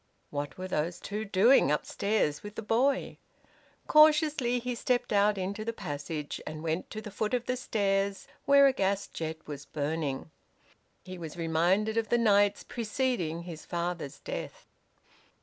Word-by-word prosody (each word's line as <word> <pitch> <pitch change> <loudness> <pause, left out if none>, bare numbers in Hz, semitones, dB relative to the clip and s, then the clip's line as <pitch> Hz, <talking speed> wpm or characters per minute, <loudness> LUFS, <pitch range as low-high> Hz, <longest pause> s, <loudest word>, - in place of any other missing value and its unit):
What 145 0 -4
were 185 0 -5
those 170 0 -2
two 210 +1 -4
doing 200 - +5
upstairs 150 +1 0
with 210 0 -9
the - - -5
boy? 255 +6 +1 0.7
Cautiously 300 -5 +5
he 245 +1 -3
stepped 245 0 0
out 205 0 +3
into 195 +3 -3
the 230 +1 -3
passage, 150 -5 -5
and 155 0 -6
went 165 +2 -2
to 215 - -6
the 210 - -8
foot 215 +4 -1
of 245 -1 -2
the 255 - 0
stairs, 200 -4 -1 0.2
where 280 0 +7
a 270 - +5
gas 200 -2 0
jet 160 0 -5
was 145 -1 -8
burning. 150 -1 -3 0.7
He 185 -1 -8
was 165 0 -7
reminded 175 +7 +1
of 225 -1 0
the 240 - +3
nights 205 -3 +3
preceding 225 -8 -2
his 165 -3 -8
father's 170 -4 -3
death. - - -6
200 Hz, 155 wpm, -29 LUFS, 165-230 Hz, 0.7 s, where